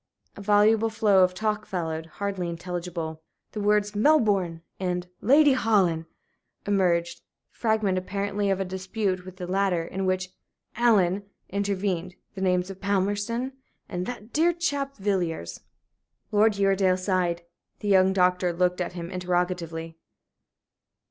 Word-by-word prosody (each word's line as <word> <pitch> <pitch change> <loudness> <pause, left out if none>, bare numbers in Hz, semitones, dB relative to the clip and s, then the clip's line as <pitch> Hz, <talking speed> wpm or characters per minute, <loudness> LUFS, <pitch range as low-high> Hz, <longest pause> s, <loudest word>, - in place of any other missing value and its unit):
A - - -9
voluble 210 +2 +4
flow 210 -4 +4
of 180 0 +1
talk 215 +1 -1
followed 165 -5 -3
hardly 190 0 -3
intelligible. 170 -2 -5 0.3
The 210 - -4
words 205 0 +2
"Melbourne" 205 - +2 0.2
and 180 -1 -2 0.2
"Lady 285 +4 +6
Holland" 195 -10 +2 0.6
emerged 180 -4 +1
the - - -41 0.4
fragment, 220 -5 +1
apparently, 200 +2 -2
of 195 -1 +1
a 195 - -1
dispute 190 0 -2
with 185 0 -10
the 180 - -5
latter, 185 -2 +1
in 190 +2 -3
which 185 0 0 0.5
"Allen" 205 -5 +3 0.3
intervened 190 -3 -2 0.2
the 190 - -7
names 180 0 +1
of 190 - -12
"Palmerston" 205 +5 0 0.4
and 180 +1 -4
"that 235 -2 -7
dear 335 +3 +3
chap, 285 -5 -2
Villiers." 175 - -2 0.7
Lord 215 +1 +4
Uredale 195 -2 +3
sighed. 185 -2 0 0.4
The 210 - -4
young 190 -1 +5
doctor 180 -1 +2
looked 180 +1 0
at 180 - -3
him 170 0 -6
interrogatively. 175 -3 -2
190 Hz, 135 wpm, -26 LUFS, 180-205 Hz, 0.7 s, Lady